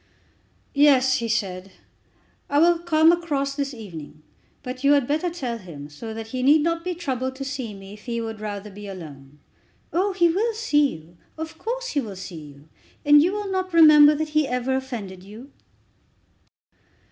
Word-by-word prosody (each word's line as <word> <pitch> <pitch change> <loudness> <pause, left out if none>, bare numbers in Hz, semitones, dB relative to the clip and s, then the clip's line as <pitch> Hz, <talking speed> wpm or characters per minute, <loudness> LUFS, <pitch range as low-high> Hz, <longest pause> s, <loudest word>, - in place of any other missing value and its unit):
"Yes," 270 -3 +4
he 235 - -3
said, 190 -3 -2 0.8
"I 285 - +1
will 340 +2 +5
come 325 -1 +4
across 290 -5 -1
this 280 -1 -3
evening. 165 - -10 0.4
But 255 +1 -7
you 280 +1 +5
had 285 -3 +3
better 310 +6 0
tell 255 -9 -4
him, 150 -7 -10
so 220 +10 -8
that 225 0 -7
he 255 +2 -3
need 295 +4 +5
not 335 0 -1
be 360 0 -3
troubled 260 -6 -3
to 275 +1 -6
see 260 -6 -5
me 195 0 -11
if 210 0 -15
he 235 -1 -3
would 225 -1 -5
rather 210 -1 -6
be 205 +1 -10
alone." 150 -7 -10 0.6
"Oh, 385 +3 +1
he 345 -2 +4
will 425 +7 0
see 295 - +2
you. 160 +2 -16 0.2
Of 320 0 -7
course - - -4
he 295 - 0
will 210 -6 -7
see 180 -3 -8
you. 145 0 -14 0.4
And 290 0 +7
you 350 +4 +2
will 410 -1 -4
not 370 -2 -2
remember 305 -2 +8
that 310 +1 -3
he 305 -1 +1
ever 250 +1 -1
offended 225 -9 -5
you?" 220 +8 -12
265 Hz, 180 wpm, -23 LUFS, 205-315 Hz, 0.8 s, remember